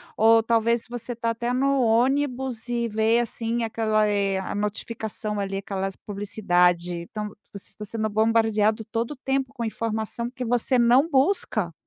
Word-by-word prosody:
ou 225 +1 +5
talvez 230 0 +1
se - - -13
você 245 0 -4
está 230 -1 -1
até 235 +1 -2
no 270 +1 +2
ônibus, 250 0 +1
e 235 -1 0
ver, 220 +2 +2
assim, 235 0 -2
aquela, 215 -1 +1
eh, 200 -2 +1
a 190 - -4
notificação 210 0 -4
ali, 195 -1 -2
aquelas 195 -1 -4
publicidade. 180 -4 +1
Então, 210 +5 -6 0.2
você 200 - -9
está 210 - -9
sendo 215 +1 -2
bombardeado 220 0 +2
todo 230 +3 -3
o - - -5
tempo 270 0 -2
com 235 -4 -4
informação, 225 +1 -3
que 255 -1 -5
você 245 +2 +2
não 250 +6 +4
busca. 265 - +1
225 Hz, 160 wpm, -24 LUFS, 210-240 Hz, 0.2 s, ou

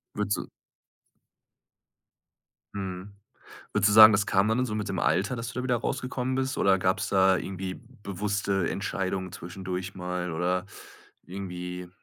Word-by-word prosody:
Würdest 105 -1 0
du - - -5 2.3
Mhm. 95 0 -5 0.6
Würdest 105 0 +4
du - - +2
sagen, 110 0 +11
das 105 0 +2
kann 95 +2 +3
dann 110 +3 +1
in 130 - +2
so 105 -4 -3
mit 105 -2 -3
dem 95 -3 -2
Alter, 95 - +1
dass 115 +1 -5
du 125 - -4
da - - -3
wieder 125 -2 +1
rausgekommen 125 +2 -2
bist 130 0 -1
oder 95 -1 +4
gab's 95 +2 0
da 95 -1 +4
irgendwie 95 0 -5 0.3
bewusste 100 -1 -1
Entscheidungen 95 -2 -3
zwischendurch 90 +2 -6
mal 90 -1 -3
oder 90 +3 0 0.6
irgendwie, 90 -1 -6
95 Hz, 150 wpm, -27 LUFS, 90-105 Hz, 2.3 s, sagen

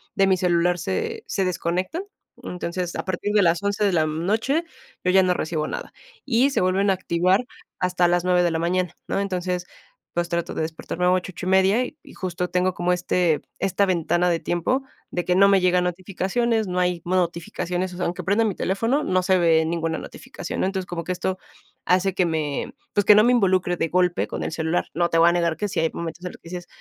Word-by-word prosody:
de 195 - +4
mi 190 -1 +3
celular 175 0 +2
se 450 - -3
se 195 - 0
desconectan. 180 - -2 0.4
Entonces, 180 0 -4
a - - -4
partir 190 +2 -2
de 210 - +5
las 170 0 +2
11 200 +1 -1
de 195 - +2
la, 160 -2 +3
mm, 155 +2 -3
noche 255 - +1 0.4
yo 180 - +4
ya 190 0 +5
no 180 -1 +2
recibo 155 -2 -2
nada, - - -6 0.3
y 260 +1 +3
se 275 - 0
vuelven 190 +2 +2
a - - +5
activar 185 +4 +1 0.3
hasta 180 -1 +2
las 175 0 +2
9 180 -1 +3
de 175 - +2
la 160 - -1
mañana, 180 +1 0
¿no? - - -1
Entonces, 180 -2 -2 0.5
pues, 175 0 0
trato 170 -1 -2
de - - -3
despertarme 165 +2 -3
a 180 - +4
8, 185 0 0
8 175 - -7
y - - -1
media, 190 +5 +4
y 295 - -10
y - - -14
justo 180 -1 -3
tengo 180 0 +1
como 175 0 0
este 180 -3 +1 0.2
esta 195 +1 +1
ventana 180 -1 +1
de 170 -1 +1
tiempo 215 +11 0 0.3
de 175 - -1
que 180 - +2
no 195 +2 +6
me 195 -1 +4
llegan 180 0 +3
notificaciones, 195 +5 -1
no 180 0 -1
hay 180 -1 0
mo 180 +2 0
notificaciones, 180 +1 -2
o - - -8
sea, 180 - -1
aunque 175 - -3
prenda 205 +4 +2
mi 205 -4 -1
teléfono, 230 +10 0
no 185 0 +1
se 185 +1 +3
ve 165 -2 +4
ninguna 165 0 -1
notificación, - - -7
¿no? - - +2
Entonces, 190 -1 -2
como 170 -1 -4
que - - -2
esto 185 +1 -2 0.5
hace 185 +1 +2
que 185 0 +2
me, 155 - -2 0.2
pues, 205 -1 +2
que 210 - +8
no 210 - +6
me 245 - +4
involucre 185 -6 +2
de 165 - 0
golpe 180 0 +1
con - - -5
el - - -3
celular. 160 +2 -1
No 170 +1 +1
te 165 - +1
voy 165 +1 +7
a - - +3
negar 170 -2 +1
que 210 - -1
sí - - -2
hay 160 0 +2
momentos 170 +1 -6
en 180 - -4
los - - -13
que 165 - -14
dices: 175 0 -7
180 Hz, 235 wpm, -23 LUFS, 170-190 Hz, 0.5 s, que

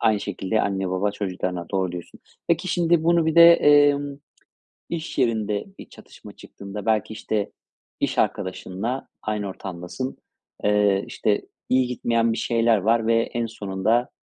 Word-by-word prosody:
Aynı 110 -2 +2
şekilde 100 +2 -1
anne 95 -1 -1
baba 95 +3 0
çocuklarına, 90 -3 -3
doğru 95 -2 -1
diyorsun. 90 -1 -9 0.3
Peki, 170 +2 +1
şimdi 170 -2 +2
bunu 170 -1 +3
bir 160 - +1
de, 170 0 +9
emm, 145 -2 +4 0.7
iş 165 -2 -5
yerinde 110 -5 0
bir - - -11
çatışma - - -14
çıktığında 100 +1 -9
belki, 110 -1 +1
işte, 110 -1 -2 0.5
iş - - -1
arkadaşınla 100 +5 -2 0.2
aynı 105 -1 -2
ortamdasın, 95 +7 -6 0.5
eee, 105 -1 +3
işte, 105 -1 0 0.3
iyi 130 -1 +3
gitmeyen 115 -2 0
bir - - -4
şeyler 115 -1 +2
var 110 +3 +1
ve 115 - +4
en 120 0 -3
sonunda, 110 +2 -1
110 Hz, 145 wpm, -23 LUFS, 100-130 Hz, 0.7 s, de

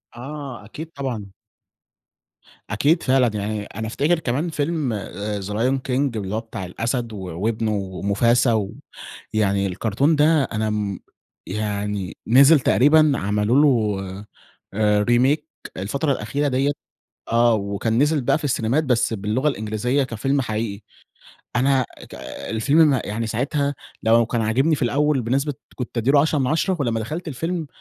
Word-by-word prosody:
آه 135 -2 -7
أكيد 155 +9 -9
طبعًا. 120 -8 -4 1.4
أكيد 150 - +2
فعلًا. 130 -1 +3
يعني 105 0 -3
أنا 110 +2 -6
أفتكر 150 +9 +1
كمان 145 +4 -1
فيلم 150 -4 -1
آآ 105 0 -4
The - - -7
Lion 115 +7 0
King 130 -1 0
اللي 100 0 -3
هو - - 0
بتاع 110 -4 -7
الأسد 115 +5 -3
و - - -6
وابنه 105 +5 -2
وموفاسا، 105 +3 +1 0.7
ويعني 100 -2 +1
الكرتون 115 - +1
ده 150 0 +4
أنا 110 -3 -2
امم 105 -3 -2 0.5
يعني 105 -3 -3
نزل 140 +6 +7
تقريبًا 150 +4 +4
عملوا 105 +5 +2
له 110 -9 +2 0.7
آآ 105 0 +2
Remake 130 +6 +3 0.3
الفترة 140 +10 -1
الأخيرة 140 +4 -1
دِيَّة 135 +1 +1 0.6
آه، 120 0 +4
وكان 100 +2 -1
نزل 150 +2 +3
بقى 125 - +2
في 155 - -9
السينيمات 130 +2 +1
بس 125 -4 +1
باللغة 110 +7 0
الإنجليزية 120 +2 -1
كفيلم 130 +4 -1
حقيقي. 110 -4 -3 0.8
أنا 130 +1 +3 0.2
ك - - -10 0.3
الفيلم 125 +8 +2
م 135 - +2
يعني 115 +2 -3
ساعتها 140 +5 -1 0.3
لو 115 +1 +4
كان 115 +1 -1
عاجبني 130 +9 +2
في - - -8
الأوّل 140 +2 +2
بنسبة 135 +5 0 0.2
كنت 125 -1 -6
أدي 115 +4 +2
له 145 -1 +6
10 155 0 +1
مِن 130 - +1
10، 175 +5 +1
ولمّا 115 -5 0
دخلت 155 +11 -5
الفيلم 165 +3 -3
120 Hz, 145 wpm, -22 LUFS, 105-140 Hz, 1.4 s, نزل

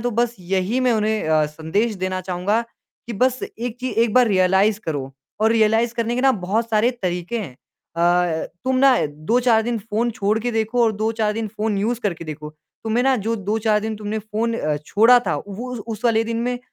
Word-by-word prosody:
तो 245 +2 -1
बस 240 +1 0
यही 190 +7 -1
मैं 250 -2 +3
उन्हें 215 -5 0
अ, 155 -1 +3
संदेश 165 +9 -1
देना 185 0 -3
चाहूँगा 185 +5 -1 0.5
कि 235 - -5
बस 255 +4 +1 0.2
1 245 0 -4
चीज़, 255 - -3
1 230 -2 +3
बार 250 -1 +6
रियलाइज़ 195 +2 +3
करो। 140 -4 -4 0.3
और 220 - +4
रियलाइज़ 225 +1 +2
करने 235 +1 -1
के 270 0 +5
बहुत 220 +6 -1
सारे 220 +3 +3
तरीके 180 +5 -2
हैं 170 -12 -6 0.4
अ, 175 -1 +2 0.2
तुम 260 0 +1
ना 265 0 +5
2-4 220 +10 +1
दिन 235 0 -2
फ़ोन 225 +3 -1
छोड़ 215 0 0
के 245 - -1
देखो 225 +2 +1
और 220 - +2
2-4 220 0 0
दिन 220 0 -3
फ़ोन 210 -1 -2
यूज़ 230 +3 -1
करके 170 -6 -3
देखो, 150 -1 -7 0.3
तुम्हें 225 +3 +1
ना 265 -1 +3
जो 225 +2 -2
2-4 210 +1 0
दिन 220 0 -4
तुमने 215 +1 -3
फ़ोन 220 +2 -2
अ, 150 -1 -1
छोड़ा 230 +7 +6
था, - - +1
वो 220 +6 -7
उस 245 - -4
उस 225 0 -6
वाले 225 -1 +3
दिन 230 0 -3
में 245 0 -1
220 Hz, 205 wpm, -21 LUFS, 190-235 Hz, 0.5 s, बार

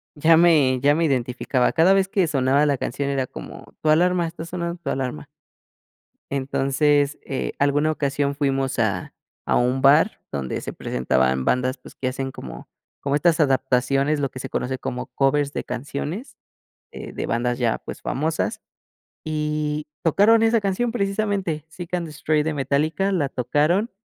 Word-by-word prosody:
ya 160 +2 +5
me 150 -7 +4
ya 145 +3 +3
me 165 - +1
identificaba, 125 -2 0
cada 165 +4 +5
vez 195 -1 +3
que 195 -1 +1
sonaba 140 0 +2
la 145 -2 +1
canción, 140 +3 -3
era 135 -2 -1
como, - - -11
tu 155 - +1
alarma, 175 +2 +3
está 165 0 -6
sonando 170 0 -4
tu 140 - -4
alarma. 125 - -3 1.0
Entonces, 140 +2 +1
eh, 135 - -3
alguna 145 +2 +2
ocasión 140 -1 -1
fuimos 135 -3 -1
a 100 -5 -1 0.4
a - - +3
un 125 +2 +1
bar 150 +9 +4
donde 70 -3 -3
se - - -6
presentaban 65 +1 0
bandas, 130 +1 +1
pues, 125 - -15
que 130 - -2
hacen 135 +1 -4
como - - -9 0.3
como 140 0 -1
estas 165 +2 +3
adaptaciones, 135 +1 +2
lo 140 -1 0
que 130 - -9
se - - -6
conoce 130 +1 -2
como 125 -1 -4
covers 140 +1 0
de - - -3
canciones, 145 - -5 0.6
eh, - - -8
de - - -4
bandas 120 +1 -1
ya, 120 -2 +1
pues, - - -9
famosas. 155 +4 -2 0.6
Y 150 -1 -2 0.2
tocaron 210 +7 +4
esa 225 -1 +3
canción, 200 +5 0
precisamente, 195 -7 -1
Seek 175 +2 -9
and 175 -2 -1
Destroy 150 0 0
de 160 0 -2
Metallica, 150 +8 0
la 150 -7 +1
tocaron, 150 - +1
145 Hz, 160 wpm, -23 LUFS, 130-165 Hz, 1.0 s, ya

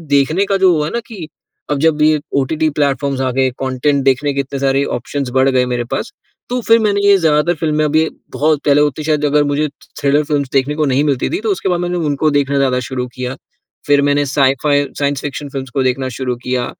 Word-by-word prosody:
देखने 155 +8 +2
का 195 0 +1
जो 190 -1 +4
हुआ 150 -1 0
है - - -5
ना 235 - 0
कि 190 -9 -8 0.4
अब 145 -1 0
जब 155 0 +2
ये 155 0 +4 0.2
ओटीटी 155 +4 0
प्लेटफ़ॉर्म्स 140 -1 0
आ 130 -1 0
गए, 130 +1 +1
कंटेंट 135 +2 0
देखने 140 +2 +1
के 140 - -3
इतने 140 0 -3
सारे 135 0 +1
ऑप्शंस 135 +2 -4
बढ़ 135 +1 +4
गए 130 -1 +2
मेरे 120 - -1
पास, 135 - -3 0.4
तो 250 - -1
फिर 230 0 +6
मैंने 205 -2 +1
ये 200 -1 +6
ज़्यादातर 160 -1 +2
फ़िल्में 155 -1 +1
अभी 155 +2 +2 0.3
बहुत 150 -1 +1
पहले 145 0 +4
होती 150 +1 0
है - - -6
शायद 150 -1 +1
अगर 145 0 +3
मुझे, 145 +1 0
थ्रि 145 - -19
थ्रिलर 145 +2 +2
फ़िल्म्स 145 -3 -1
देखने 140 +2 +1
को 155 -1 +1
नहीं 135 +1 +1
मिलती 140 -4 0
थी, 350 - -2
तो 440 - -2
उसके 365 - -2
बाद 175 -1 0
मैंने 175 0 -2
उनको 145 +2 +1
देखना 140 -1 +1
ज़्यादा 130 -2 +2
शुरू 125 -1 -3
किया। 125 0 -4 0.5
फिर 145 -1 +4
मैंने 145 0 +2
साई-फाई, 140 +1 +2
साइंस 140 -1 0
फ़िक्शन 145 0 -5
फ़िल्म्स 135 -1 -6
को 135 - +2
देखना 130 +1 -1
शुरू 125 -2 -2
किया, 125 -1 -1
145 Hz, 230 wpm, -16 LUFS, 135-155 Hz, 0.5 s, फिर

